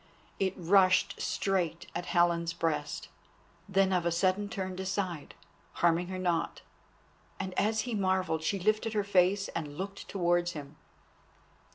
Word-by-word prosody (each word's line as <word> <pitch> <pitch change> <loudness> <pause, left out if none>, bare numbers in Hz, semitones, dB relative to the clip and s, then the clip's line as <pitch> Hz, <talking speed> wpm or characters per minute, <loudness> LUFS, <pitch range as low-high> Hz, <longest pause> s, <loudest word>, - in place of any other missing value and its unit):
It 190 -1 0
rushed 185 +1 +3
straight 175 -4 -1
at 175 - -4
Helen's 170 -1 +2
breast, 150 -3 -2 0.6
then 195 -1 +3
of 180 -2 +2
a 170 - +1
sudden 185 +4 +1
turned 185 -3 -4
aside, 190 -5 -3 0.4
harming 170 +1 +2
her 185 0 -4
not. 175 -3 -1 0.8
And 190 -1 -4
as 215 +3 +1
he 245 0 -4
marvelled 185 -5 +1
she 195 +5 0
lifted 215 +3 +1
her 210 -1 +1
face 195 0 +3
and 150 -3 -5
looked 195 +1 -6
towards 175 -2 +1
him. 145 -1 -8
185 Hz, 140 wpm, -30 LUFS, 170-195 Hz, 0.8 s, rushed